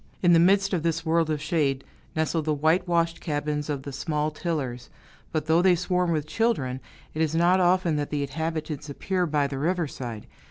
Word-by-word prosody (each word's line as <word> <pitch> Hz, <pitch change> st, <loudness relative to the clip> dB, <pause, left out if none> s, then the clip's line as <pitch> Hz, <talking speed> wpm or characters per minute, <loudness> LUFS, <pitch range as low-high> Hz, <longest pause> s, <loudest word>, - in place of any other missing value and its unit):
In 175 Hz, -1 st, +6 dB
the 165 Hz, -, +6 dB
midst 195 Hz, +3 st, +4 dB
of 175 Hz, -, +1 dB
this 165 Hz, 0 st, -1 dB
world 165 Hz, 0 st, +2 dB
of 155 Hz, -1 st, 0 dB
shade, 145 Hz, -4 st, 0 dB, 0.3 s
nestle 160 Hz, +1 st, 0 dB
the 155 Hz, 0 st, 0 dB
whitewashed 165 Hz, +2 st, +1 dB
cabins 150 Hz, -1 st, -2 dB
of 140 Hz, -2 st, -3 dB
the 140 Hz, -, -6 dB
small 150 Hz, +2 st, -1 dB
tillers; 150 Hz, -7 st, -4 dB, 0.4 s
but 155 Hz, -2 st, -1 dB
though 160 Hz, +2 st, +4 dB
they 185 Hz, -1 st, +5 dB
swarm 180 Hz, 0 st, 0 dB
with 155 Hz, -3 st, 0 dB
children, 155 Hz, -, 0 dB, 0.3 s
it 155 Hz, -, -2 dB
is 160 Hz, 0 st, +1 dB
not 175 Hz, +3 st, +4 dB
often 180 Hz, -3 st, +3 dB
that 145 Hz, -1 st, -2 dB
the 145 Hz, -1 st, -1 dB
inhabitants 155 Hz, 0 st, -4 dB
appear 180 Hz, +5 st, -1 dB
by 150 Hz, -2 st, +1 dB
the 140 Hz, -1 st, -4 dB
riverside. 140 Hz, -, -2 dB
160 Hz, 190 wpm, -26 LUFS, 145-175 Hz, 0.4 s, In